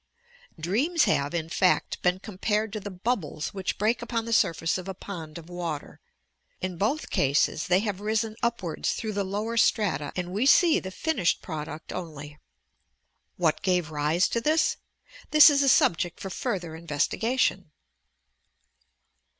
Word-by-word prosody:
Dreams 270 - +1
have, 140 +1 +1
in 160 -2 -2
fact, 180 +2 +1
been 180 0 +2
compared 210 +2 -2
to 215 - -3
the 205 - -7
bubbles 185 -5 -3
which 190 -2 -3
break 220 +4 +1
upon 230 -1 -2
the 230 - -2
surface 165 -3 +2
of 185 - -8
a 190 - -5
pond 165 -5 -8
of 165 -1 -11
water. 175 -4 -5 0.6
In 185 -1 -3
both 255 +10 -1
eases 140 +2 +2
they 180 +2 +3
have 205 -3 -3
risen 220 +1 -1
upwards 200 -9 -1
through 220 -1 -4
the 200 0 -1
lower 210 +4 -3
strata 165 -11 +2
and 180 -1 -3
we 220 +7 +1
see 335 +2 +6
the 190 - -7
finished 195 - 0
product 155 -1 -6
only. 150 -4 -7 1.0
What 165 -4 +1
gave 180 -4 0
rise 155 +4 +1
to 235 - -1
thisT 315 +5 +2 0.5
This 305 0 +9
is 280 -1 +3
a 275 - +4
subject 175 -6 +2
for 195 - -6
further 180 -8 -3
investigation. 170 - 0
190 Hz, 150 wpm, -27 LUFS, 165-225 Hz, 1.0 s, This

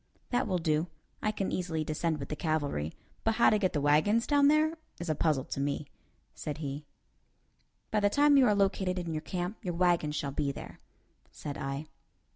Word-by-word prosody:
"That 245 +1 +1
will 185 - +1
do. 160 0 +1 0.3
I 215 - +1
can 200 -2 -2
easily 165 -4 -1
descend 155 +1 -1
with 140 -2 -7
the 150 - -2
cavalry, 145 - -1 0.3
but 225 0 +2
how 235 - +5
to 215 - +3
get 185 -3 +1
the 150 - +1
wagons 155 +11 +3
down 285 -1 +4
there 310 +2 +3 0.2
is 170 -1 -4
a - - +3
puzzler 150 -3 +1
to - - -5
me," 140 +1 -1 0.5
said 150 - -5
he. 145 -1 -5 1.0
"By 215 - +2
the 205 0 +3
time 290 +6 +5
you 265 -3 +6
are 210 - +4
located 190 -2 +1
in 170 -2 -3
your 155 - -2
camp, 180 +4 -3
your 175 -3 -2
wagons 170 -4 +2
shall 140 -1 -2
be 140 0 -1
there," - - -9 0.5
said 145 -1 -6
I. 135 +2 -4
170 Hz, 200 wpm, -30 LUFS, 150-205 Hz, 1.0 s, you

